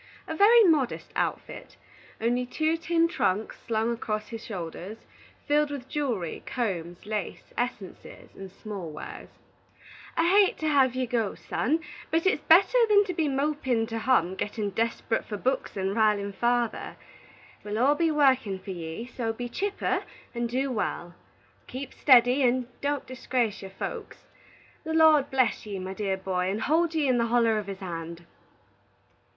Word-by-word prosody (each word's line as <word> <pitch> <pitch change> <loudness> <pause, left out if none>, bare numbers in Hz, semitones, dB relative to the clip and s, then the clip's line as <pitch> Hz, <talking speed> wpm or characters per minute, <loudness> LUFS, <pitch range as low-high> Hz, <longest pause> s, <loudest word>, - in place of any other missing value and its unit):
A 320 - -4
very 450 +6 +7
modest 305 - +1
outfit, - - -3 0.4
only 240 +2 +1
two 315 +6 0
tin 330 0 +1
trunks 215 - -1
slung 225 +1 0
across 215 -2 -4
the 225 - -5
shoulders, 190 -1 -7 0.5
filled 295 0 +3
with 280 -3 -6
jewelry, 240 - -2
combs, 175 -8 -3
lace, 210 -3 -5
essences, 240 -6 -5
and 195 -1 -9
small 195 -4 -7
wares. 150 - -9 0.9
"I 330 - +3
hate 395 +2 +4
to 315 - -2
have 270 -4 +3
ye 255 0 0
go, 230 -4 -1
son, 310 +7 -1 0.3
but 325 +2 +1
it's 380 -5 +2
better 380 +9 +6
than 410 -1 +6
to 365 - -3
be 320 -3 0
mopin' 270 -4 0
to 225 0 -3
hum, 220 -8 +2
gettin' 205 +1 -3
desperut 225 +2 -1
for 210 - -6
books 260 -1 -2
and 190 +1 -1
rilin' 210 -2 +2
father. 240 +2 -1 0.7
We'll 210 0 -4
all 265 +5 +4
be 330 +2 +1
workin' 265 -9 +3
for 190 +1 -8
ye, 165 +4 -6
so 240 -2 -3
be 245 +2 -6
chipper 400 +10 -1 0.3
and 235 -1 -2
do 265 +3 -1
wal. 175 -6 -3 0.5
Keep 265 +2 -6
steddy, 250 0 +5
and 250 0 +2 0.2
don't 285 0 -1
disgrace 250 -4 -2
your 195 - -8
folks. 195 - -6 0.7
The 320 0 -3
Lord 310 -3 +5
bless 255 -4 +1
ye, 200 -2 -4
my 190 0 -5
dear 195 -1 -2
boy, 185 -1 -1
and 210 +3 -2
hold 325 +2 +2
ye 305 -3 +2
in 250 -2 +3
the 235 - +1
holler 230 -2 +3
of 205 - -7
his 195 -1 -7
hand!" 170 -1 -6
240 Hz, 160 wpm, -27 LUFS, 205-290 Hz, 0.9 s, very